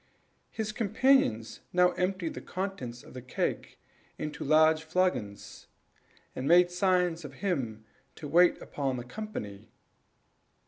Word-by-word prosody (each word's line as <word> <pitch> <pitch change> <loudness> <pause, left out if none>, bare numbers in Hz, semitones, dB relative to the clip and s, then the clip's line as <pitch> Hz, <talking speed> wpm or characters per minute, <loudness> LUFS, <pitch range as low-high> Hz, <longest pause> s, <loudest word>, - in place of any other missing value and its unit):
His 215 -1 -4
companion 220 - +2 0.3
now 180 0 +4
emptied 180 -2 -2
the - - -7
contents 180 -11 -5
of - - -14
the 130 - -7
keg 125 - -3 0.4
into 150 -1 -5
large 155 0 +4
flagons, 160 - -2 0.7
and 130 - -3
made 175 +2 +6
signs 180 -2 +1
to 150 - -7
him 130 - -3 0.3
to 150 - -8
wait 175 +4 +4
upon 135 -3 -3
the 120 - -5
company. 125 - -7
165 Hz, 125 wpm, -29 LUFS, 130-185 Hz, 0.7 s, made